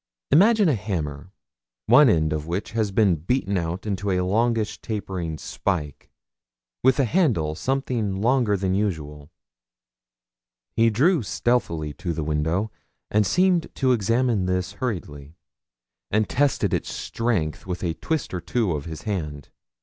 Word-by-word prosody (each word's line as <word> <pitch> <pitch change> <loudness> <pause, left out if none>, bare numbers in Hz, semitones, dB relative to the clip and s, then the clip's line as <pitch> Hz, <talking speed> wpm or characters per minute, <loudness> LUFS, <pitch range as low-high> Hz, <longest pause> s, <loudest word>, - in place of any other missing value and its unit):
Imagine 205 +7 +5
a 155 - +3
hammer, 90 - -4 0.5
one 130 +4 +7
end 80 -5 +2
of 75 0 -4
which 90 +4 -3
had 110 -3 -1
been 100 -6 +4
beaten 100 - -1
out 85 +1 -2
into 100 -1 -2
a 90 -1 +1
longish 110 +3 0
tapering 95 -7 -4
spike, 75 -5 -3 0.7
with 130 +2 +4
a 135 - +4
handle 115 - +1
something 120 - -1
longer 115 -2 +2
than 95 0 -1
usual. 75 -8 -3 1.5
He 115 0 +4
drew 150 - +3
stealthily 95 -7 -1
to 85 -3 -2
the 80 - -3
window, 80 +7 -1 0.4
and 105 -1 +3
seemed 180 -2 +2
to 130 -2 +2
examine 115 -2 +1
this 90 +1 -1
hurriedly, 80 - -5 0.7
and 105 +1 +1
tested 145 +1 +1
its - - -1
strength 95 -10 -2
with 90 -1 -4
a 85 -2 0
twist 160 - -3
or 90 - -3
two 100 +3 0
of 75 -1 -3
his 80 -2 -7
hand. 75 - -4
100 Hz, 140 wpm, -24 LUFS, 85-120 Hz, 1.5 s, one